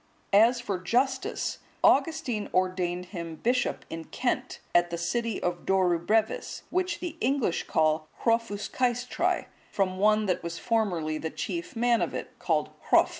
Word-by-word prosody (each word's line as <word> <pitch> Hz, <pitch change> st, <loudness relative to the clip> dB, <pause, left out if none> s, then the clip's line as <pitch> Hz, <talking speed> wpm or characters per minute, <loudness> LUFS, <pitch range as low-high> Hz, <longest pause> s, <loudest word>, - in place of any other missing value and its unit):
As 230 Hz, +4 st, +6 dB
for 205 Hz, -6 st, -3 dB
Justus, 245 Hz, +9 st, 0 dB, 0.2 s
Augustine 270 Hz, -7 st, +2 dB
ordained 180 Hz, -1 st, 0 dB
him 170 Hz, -3 st, -5 dB
bishop 245 Hz, +7 st, 0 dB
in 165 Hz, 0 st, -6 dB
Kent, 250 Hz, 0 st, -2 dB
at 175 Hz, 0 st, +4 dB
the 170 Hz, -, -3 dB
city 230 Hz, +5 st, -1 dB
of 175 Hz, 0 st, -1 dB
Dorubrevis, 190 Hz, +3 st, +1 dB
which 365 Hz, -1 st, 0 dB
the 340 Hz, -2 st, -5 dB
English 260 Hz, -8 st, +1 dB
call 155 Hz, 0 st, +2 dB, 0.2 s
Hrofaescaestrae,(176) 240 Hz, -, 0 dB, 0.3 s
from 185 Hz, -2 st, 0 dB
one 215 Hz, +1 st, +4 dB
that 185 Hz, -3 st, 0 dB
was 170 Hz, 0 st, -5 dB
formerly 175 Hz, -10 st, 0 dB
the 160 Hz, -, -3 dB
chief 340 Hz, -, -4 dB
man 235 Hz, 0 st, +3 dB
of -, -, -1 dB
it, -, -, -5 dB
called -, -, 0 dB, 0.2 s
Hrof. -, -, +6 dB
215 Hz, 140 wpm, -28 LUFS, 175-245 Hz, 0.3 s, As